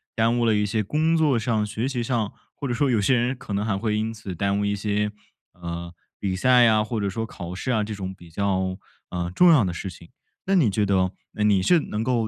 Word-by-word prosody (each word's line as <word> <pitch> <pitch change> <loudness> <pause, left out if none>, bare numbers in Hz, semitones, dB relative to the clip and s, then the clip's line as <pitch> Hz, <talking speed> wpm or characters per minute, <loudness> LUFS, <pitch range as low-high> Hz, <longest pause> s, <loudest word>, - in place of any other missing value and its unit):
耽 115 +2 +2
误 - - +2
了 110 -2 +3
一 105 0 +2
些 110 +1 0
工 155 +9 +1
作 150 -6 +3
上、 110 -1 0
学 110 +5 -2
习 125 -3 -2
上， 115 -3 -1 0.2
或 140 - -4
者 120 - -1
说 135 +3 +1
有 115 -4 +2
些 125 +6 +3
人 125 +2 +1
可 100 - -7
能 100 +1 0
还 100 -3 0
会 105 0 -1
因 110 +1 -1
此 105 -4 -7
耽 100 +3 0
误 105 - 0
一 100 - 0
些， 105 +1 -1 0.4
呃， 85 0 -6 0.3
比 95 -2 -1
赛 125 +3 +5
啊， 110 -1 +4
或 110 0 -3
者 100 - -1
说 110 +4 -3
考 90 -4 -7
试 95 - -5
啊， 110 -4 +2
这 105 +1 -5
种 95 -2 -5
比 85 -2 -16
较， 95 0 0 0.3
呃， 90 -1 -3
重 180 -1 +7
要 140 -9 +6
的 90 - -1
事 95 +2 -5
情。 85 -1 -14 0.4
那 195 - +3
你 155 -11 +4
觉 105 +1 +1
得， 95 -2 +2 0.2
哎， 105 - -1
你 100 -3 +4
是 170 - +4
能 110 -6 -3
够 120 -2 +1
105 Hz, 275 characters per minute, -24 LUFS, 95-120 Hz, 0.4 s, 重